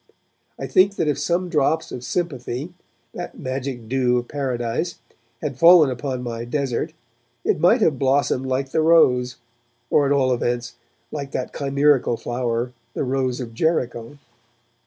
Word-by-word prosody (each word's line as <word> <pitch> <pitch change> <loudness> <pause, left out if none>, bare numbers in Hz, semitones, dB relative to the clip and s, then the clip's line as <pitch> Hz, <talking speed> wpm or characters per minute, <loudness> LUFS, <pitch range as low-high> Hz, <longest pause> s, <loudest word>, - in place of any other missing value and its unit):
I - - -5
think 195 +2 +3
that 160 - 0
if 150 - 0
some 180 +1 0
drops 160 -1 0
of 125 - -6
sympathy, 140 0 -3 0.4
that 175 - -7
magic 130 -3 -4
dew 125 0 +2
of 120 0 -3
Paradise, 130 +3 -2 0.5
had 140 -4 -4
fallen 165 -4 +7
upon 130 0 -4
my 115 -1 -4
desert, 130 0 -2 0.5
it - - +1
might - - +4
have 145 -6 +2
blossomed 135 -1 +1
like 135 +1 -1
the 160 - +2
rose, 125 -7 +4 0.6
or, 145 - +4
at - - 0
all 130 -2 +3
events, 120 0 -2 0.4
like 140 -2 -5
that 130 - -3
chimerical 140 -3 +2
flower, 120 0 -2 0.2
the - - -1
Rose 130 -1 -1
of 120 -3 -6
Jericho. 125 -3 -1
130 Hz, 150 wpm, -22 LUFS, 125-150 Hz, 0.6 s, fallen